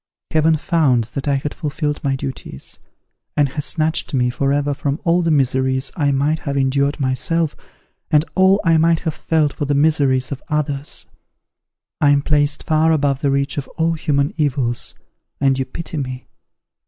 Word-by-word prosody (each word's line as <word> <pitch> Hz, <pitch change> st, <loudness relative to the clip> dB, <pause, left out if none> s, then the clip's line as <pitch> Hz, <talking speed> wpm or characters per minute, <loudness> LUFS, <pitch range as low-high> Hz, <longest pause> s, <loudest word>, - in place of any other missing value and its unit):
Heaven 160 Hz, 0 st, +3 dB
found 150 Hz, -8 st, +2 dB
that 140 Hz, +1 st, -4 dB
I 140 Hz, -, +2 dB
had 140 Hz, +2 st, -3 dB
fulfilled 150 Hz, 0 st, -3 dB
my 135 Hz, -1 st, +1 dB
duties, 130 Hz, -, -6 dB, 0.6 s
and 145 Hz, -2 st, +3 dB
has 150 Hz, +2 st, -3 dB
snatched 160 Hz, -2 st, 0 dB
me 125 Hz, -1 st, +2 dB
for 135 Hz, +2 st, 0 dB
ever 145 Hz, 0 st, +1 dB
from 140 Hz, +2 st, -2 dB
all 170 Hz, +1 st, +3 dB
the 165 Hz, -, 0 dB
miseries 130 Hz, -2 st, +1 dB
I 145 Hz, -3 st, +1 dB
might 145 Hz, +3 st, +1 dB
have 140 Hz, -2 st, -3 dB
endured 140 Hz, +2 st, +1 dB
myself, 145 Hz, +4 st, 0 dB, 0.5 s
and 155 Hz, -1 st, +3 dB
all 190 Hz, +1 st, +4 dB
I 165 Hz, -1 st, +5 dB
might 165 Hz, 0 st, +3 dB
have 160 Hz, -3 st, -2 dB
felt 155 Hz, -2 st, 0 dB
for 145 Hz, -, -3 dB
the 145 Hz, 0 st, 0 dB
miseries 140 Hz, -3 st, +2 dB
of 140 Hz, -, -5 dB
others. 145 Hz, -2 st, -2 dB, 1.0 s
I 145 Hz, -, +5 dB
am 140 Hz, 0 st, +3 dB
placed 145 Hz, -1 st, +1 dB
far 160 Hz, +1 st, +2 dB
above 140 Hz, -3 st, +1 dB
the 145 Hz, -, +1 dB
reach 140 Hz, +1 st, 0 dB
of 140 Hz, -, -6 dB
all 165 Hz, +1 st, +2 dB
human 145 Hz, -3 st, 0 dB
evils, 130 Hz, -6 st, 0 dB, 0.4 s
and 135 Hz, -1 st, +2 dB
you 130 Hz, -, 0 dB
pity 160 Hz, +2 st, -6 dB
me! 130 Hz, -2 st, -4 dB
145 Hz, 175 wpm, -19 LUFS, 135-155 Hz, 1.0 s, I